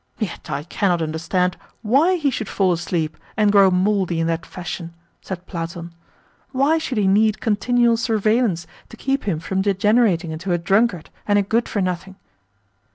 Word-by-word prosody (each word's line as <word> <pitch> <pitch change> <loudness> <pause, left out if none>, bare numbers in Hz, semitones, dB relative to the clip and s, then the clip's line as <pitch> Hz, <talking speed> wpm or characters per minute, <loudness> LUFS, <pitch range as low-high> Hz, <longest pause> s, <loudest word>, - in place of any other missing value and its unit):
"Yet 205 -7 -5
I 145 0 -3
cannot 175 0 0
understand 165 +3 -1 0.3
WHY 280 - +3
he 295 -6 0
should 220 -4 -4
fall 190 -3 +2
asleep 165 -2 -2 0.2
and 210 -2 +4
grow 200 -2 +6
mouldy 185 -2 +1
in 165 - +1
that 165 0 -2
fashion," 175 -1 -7 0.3
said 185 -2 -7
Platon. 170 -1 -6 0.6
"Why 285 +5 +2
should 270 -7 -4
he 205 - +2
need 215 +2 +3
continual 235 +2 +2
surveillance 220 -4 +1 0.2
to 230 - -12
keep 270 +3 -1
him 180 -7 -1
from 190 +4 -2
degenerating 200 -3 +2
into 170 +4 -3
a - - +2
drunkard 195 0 +1 0.2
and 205 0 +3
a 205 - +3
good 225 +4 0
for 205 - -1
nothing?" 185 +1 -4
195 Hz, 165 wpm, -21 LUFS, 170-220 Hz, 0.6 s, grow